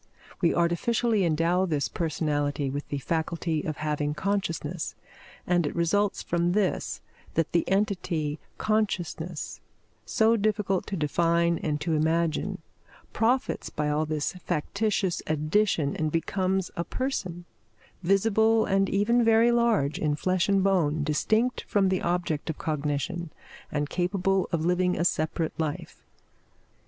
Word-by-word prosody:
We 170 Hz, -, +3 dB
artificially 210 Hz, +5 st, +1 dB
endow 170 Hz, +3 st, +2 dB
this 145 Hz, -7 st, 0 dB
personality 145 Hz, -1 st, -1 dB
with 145 Hz, +1 st, -4 dB
the 145 Hz, -, -3 dB
faculty 160 Hz, +2 st, -1 dB
of 155 Hz, -, -4 dB
having 150 Hz, -1 st, -1 dB
consciousness; 175 Hz, -3 st, -2 dB, 0.5 s
and 175 Hz, -3 st, +2 dB
it -, -, -5 dB
results 190 Hz, +4 st, +1 dB
from 175 Hz, +1 st, 0 dB
this 200 Hz, -2 st, 0 dB, 0.3 s
that 165 Hz, -1 st, +1 dB
the 170 Hz, -, +1 dB
entity 180 Hz, -7 st, 0 dB, 0.2 s
consciousness, 180 Hz, -6 st, -2 dB, 0.4 s
so 225 Hz, +1 st, +3 dB
difficult 205 Hz, -3 st, 0 dB
to 195 Hz, -, -3 dB
define 170 Hz, +2 st, +2 dB
and 150 Hz, -2 st, -1 dB
to 160 Hz, +1 st, 0 dB
imagine, 160 Hz, +1 st, 0 dB, 0.5 s
profits 245 Hz, +3 st, 0 dB
by 150 Hz, 0 st, -2 dB
all 150 Hz, +1 st, 0 dB
this 155 Hz, -1 st, -1 dB
factitious 200 Hz, +3 st, -1 dB
addition 155 Hz, 0 st, +1 dB
and 155 Hz, -1 st, -1 dB
becomes 185 Hz, +3 st, 0 dB
a 170 Hz, -, -1 dB
person, 185 Hz, -9 st, -3 dB, 0.6 s
visible 220 Hz, +4 st, +3 dB
and 195 Hz, -1 st, +2 dB
even 235 Hz, +5 st, +3 dB
very 225 Hz, +1 st, +5 dB
large, 230 Hz, -12 st, +2 dB
in 150 Hz, -1 st, +1 dB
flesh 185 Hz, +4 st, 0 dB
and 195 Hz, -1 st, +3 dB
bone, 160 Hz, -6 st, +2 dB
distinct 220 Hz, -, +1 dB
from 195 Hz, -2 st, +2 dB
the 185 Hz, -1 st, 0 dB
object 170 Hz, -3 st, -1 dB
of 160 Hz, -, -3 dB
cognition, 155 Hz, +3 st, -2 dB, 0.4 s
and 145 Hz, -1 st, -1 dB
capable 185 Hz, +2 st, 0 dB
of 165 Hz, -1 st, 0 dB
living 180 Hz, +1 st, +2 dB
a 170 Hz, -, +1 dB
separate 160 Hz, -1 st, 0 dB
life. 160 Hz, +2 st, -4 dB
170 Hz, 130 wpm, -27 LUFS, 155-195 Hz, 0.6 s, very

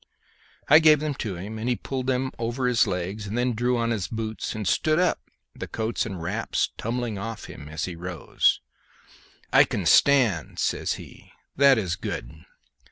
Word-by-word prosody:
I 155 Hz, +2 st, +8 dB
gave 155 Hz, -2 st, +6 dB
them 150 Hz, -1 st, -2 dB
to 105 Hz, -5 st, -3 dB
him, 105 Hz, +5 st, -7 dB
and 115 Hz, +3 st, -2 dB
he 125 Hz, -, +2 dB
pulled 130 Hz, +4 st, -5 dB
them 130 Hz, 0 st, 0 dB
over 120 Hz, +3 st, -2 dB
his 125 Hz, -2 st, +3 dB
legs 95 Hz, +4 st, -3 dB
and 105 Hz, +4 st, -4 dB
then 125 Hz, 0 st, +1 dB
drew 120 Hz, +2 st, 0 dB
on 115 Hz, 0 st, 0 dB
his 105 Hz, -5 st, -1 dB
boots 110 Hz, -1 st, -4 dB
and 105 Hz, -3 st, -3 dB
stood 155 Hz, +8 st, +2 dB
up, 180 Hz, 0 st, +2 dB, 0.3 s
the -, -, -7 dB
coats 110 Hz, 0 st, -2 dB
and 95 Hz, -4 st, -6 dB
wraps 85 Hz, -, -1 dB
tumbling 115 Hz, -2 st, -3 dB
off 115 Hz, +1 st, -6 dB
him 70 Hz, -, -10 dB
as 75 Hz, 0 st, -3 dB
he 90 Hz, -, -6 dB
rose. 85 Hz, -1 st, 0 dB, 0.9 s
"I -, -, +8 dB
can 95 Hz, -, -3 dB
stand," 115 Hz, -, +4 dB
says -, -, 0 dB
he. -, -, -12 dB, 0.2 s
"That 140 Hz, -1 st, +6 dB
is 90 Hz, -6 st, -1 dB
good." -, -, -5 dB
115 Hz, 180 wpm, -25 LUFS, 95-125 Hz, 0.9 s, I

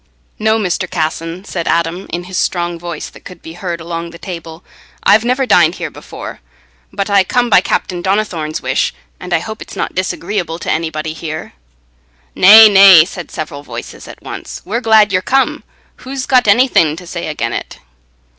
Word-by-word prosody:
"No, 220 Hz, +1 st, +2 dB
Mr. 185 Hz, -3 st, -2 dB
Casson," 165 Hz, +3 st, -3 dB
said 170 Hz, -4 st, -4 dB
Adam, 170 Hz, +3 st, -1 dB
in 175 Hz, +1 st, -4 dB
his 185 Hz, +1 st, -9 dB
strong 175 Hz, -2 st, -1 dB
voice, 170 Hz, -2 st, -6 dB
that -, -, -16 dB
could 180 Hz, -2 st, -12 dB
be 160 Hz, -, -9 dB
heard 175 Hz, -1 st, -5 dB
along 170 Hz, 0 st, -5 dB
the 170 Hz, -, -12 dB
table; 165 Hz, -2 st, -8 dB, 0.4 s
"I've 210 Hz, +2 st, +5 dB
never 255 Hz, +2 st, +1 dB
dined -, -, +4 dB
here -, -, -5 dB
before, -, -, -9 dB, 0.5 s
but 200 Hz, 0 st, -3 dB
I 200 Hz, -2 st, +4 dB
come 240 Hz, +5 st, 0 dB
by 185 Hz, -, +6 dB
Captain 180 Hz, -1 st, -2 dB
Donnithorne's 185 Hz, -6 st, -2 dB
wish, 130 Hz, +1 st, 0 dB, 0.2 s
and 180 Hz, -, -9 dB
I 175 Hz, -, +3 dB
hope 220 Hz, +6 st, -7 dB
it's -, -, -10 dB
not -, -, -3 dB
disagreeable 175 Hz, -2 st, -3 dB
to -, -, -4 dB
anybody 160 Hz, -1 st, -2 dB
here." 160 Hz, -1 st, -7 dB, 0.8 s
"Nay, 215 Hz, +4 st, +9 dB
nay," 195 Hz, -5 st, +8 dB
said 175 Hz, -1 st, -8 dB
several 145 Hz, -2 st, -6 dB
voices 120 Hz, -4 st, -9 dB
at -, -, -13 dB
once, -, -, -8 dB
"we're 230 Hz, +5 st, -2 dB
glad 220 Hz, -3 st, +4 dB
ye're 185 Hz, -, +2 dB
come. 270 Hz, +7 st, 0 dB, 0.3 s
Who's 260 Hz, 0 st, -6 dB
got 255 Hz, -4 st, +3 dB
anything 200 Hz, -, +4 dB
to 180 Hz, +2 st, -11 dB
say -, -, -5 dB
again' -, -, -3 dB
it?" -, -, -6 dB
180 Hz, 180 wpm, -15 LUFS, 165-205 Hz, 0.8 s, Nay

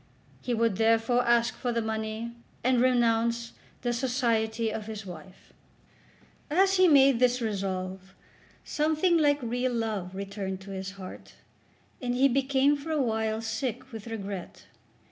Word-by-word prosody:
He 245 Hz, -, -1 dB
would, 225 Hz, -4 st, +1 dB
therefore, 225 Hz, +2 st, +3 dB
ask 235 Hz, 0 st, +3 dB
for 245 Hz, -, -2 dB
the 235 Hz, -, 0 dB
money, 220 Hz, +1 st, -3 dB, 0.3 s
and 250 Hz, 0 st, +3 dB
renounce 235 Hz, -2 st, +2 dB, 0.3 s
the 240 Hz, -1 st, 0 dB
society 230 Hz, -3 st, 0 dB
of 220 Hz, -1 st, -5 dB
his 215 Hz, -2 st, -6 dB
wife. 180 Hz, +1 st, -12 dB, 1.0 s
As 380 Hz, +5 st, +3 dB
he 370 Hz, 0 st, +6 dB
made 275 Hz, -5 st, +6 dB
this 250 Hz, 0 st, +3 dB
resolve 190 Hz, -3 st, -4 dB, 0.5 s
something 315 Hz, +3 st, +2 dB
like 290 Hz, -2 st, +4 dB
real 245 Hz, +2 st, -1 dB
love 210 Hz, -5 st, -3 dB
returned 195 Hz, -1 st, -4 dB
to 195 Hz, +1 st, -10 dB
his 190 Hz, 0 st, -5 dB
heart, 190 Hz, -2 st, -10 dB, 0.7 s
and 245 Hz, -1 st, -1 dB
he 265 Hz, +2 st, +5 dB
became 275 Hz, +2 st, +2 dB
for 285 Hz, +3 st, -8 dB
a 310 Hz, -1 st, +1 dB
while 220 Hz, -3 st, 0 dB
sick 245 Hz, +3 st, -3 dB
with 225 Hz, -1 st, -8 dB
regret. 200 Hz, -5 st, -6 dB
230 Hz, 145 wpm, -28 LUFS, 215-255 Hz, 1.0 s, he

